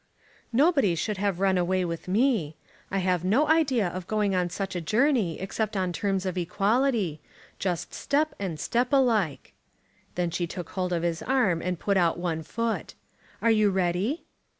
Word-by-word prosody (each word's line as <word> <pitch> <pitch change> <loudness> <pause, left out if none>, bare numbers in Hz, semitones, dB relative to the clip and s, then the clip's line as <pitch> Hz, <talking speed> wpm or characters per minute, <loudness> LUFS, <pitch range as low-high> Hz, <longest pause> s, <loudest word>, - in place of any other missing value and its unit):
"Nobody 275 - +3
should 210 +5 -2
have 195 -2 -1
run 190 -1 +3
away 185 +1 +1
with 170 0 -5
me. 200 - +1 0.3
I 195 - -1
have 180 -2 +1
no 235 +12 +3
idea 270 - +3
of 180 +1 -6
going 210 -2 +1
on 180 -1 +1
such 195 +2 -4
a 175 - -2
journey 215 - +1
except 210 +2 -2
on 185 -2 -1
terms 195 0 -1
of 185 -1 -2
equality, 200 - +1 0.4
just 180 -3 -2
step 305 +2 0
and 180 -6 -4
step 245 +2 0
alike." 220 - +1 0.6
Then 175 -1 -1
she 175 0 -1
took 175 -1 -7
hold 185 -1 -2
of 170 -1 0
his 170 -1 -1
arm 210 -11 +1
and 180 0 -2
put 200 +1 +1
out 170 -3 +2
one 170 -2 -2
foot. 230 +8 -3 0.5
"Are 230 - +5
you 215 -2 +4
ready?" 190 - 0
190 Hz, 175 wpm, -27 LUFS, 175-230 Hz, 0.6 s, Are